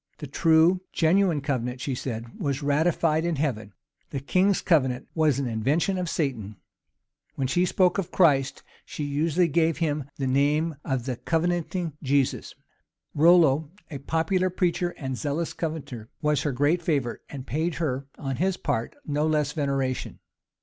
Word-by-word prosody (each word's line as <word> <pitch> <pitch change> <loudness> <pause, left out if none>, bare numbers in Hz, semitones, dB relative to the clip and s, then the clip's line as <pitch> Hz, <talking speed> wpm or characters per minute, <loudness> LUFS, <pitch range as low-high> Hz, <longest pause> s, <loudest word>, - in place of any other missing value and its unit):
The 150 - -7
true, 160 +5 +3
genuine 170 -1 +2
covenant, 125 -3 -2
she 135 +1 -3
said, 120 -2 -6
was 140 0 -2
ratified 155 +2 +2
in 170 -1 0
heaven: 120 -8 -2 0.4
the 140 - -3
king's 185 +8 +2
covenant 130 -7 +1
was 155 -5 +2
an 140 - -1
invention 140 - 0
of 180 -2 -2
Satan: 115 - -2 0.8
when 135 - -1
she 175 +8 +1
spoke 180 +1 +2
of 185 - -3
Christ, 140 -6 +2 0.2
she 150 - -6
usually 155 +4 +1
gave 165 +1 +1
him 150 -4 -1
the 135 - -2
name 145 +4 +1
of 130 -3 -2
the 130 -3 -3
Covenanting 170 +1 -1
Jesus. 140 -1 0 0.6
Rollo, 160 -2 +5 0.2
a 140 - -5
popular 165 +6 0
preacher, 175 -1 0
and 130 -2 -4
zealous 155 +3 -2
Covenanter, 145 -9 -5
was 150 -3 +1
her 145 - -1
great 145 +7 +1
favorite, 140 -8 -1
and 135 -3 -7
paid 160 +3 -1
her, 135 -4 -2
on 135 -3 -4
his 190 +1 0
part, 125 -6 -2
no 150 +1 0
less 150 -2 +1
veneration. 135 -4 -2
150 Hz, 155 wpm, -26 LUFS, 135-165 Hz, 0.8 s, Rollo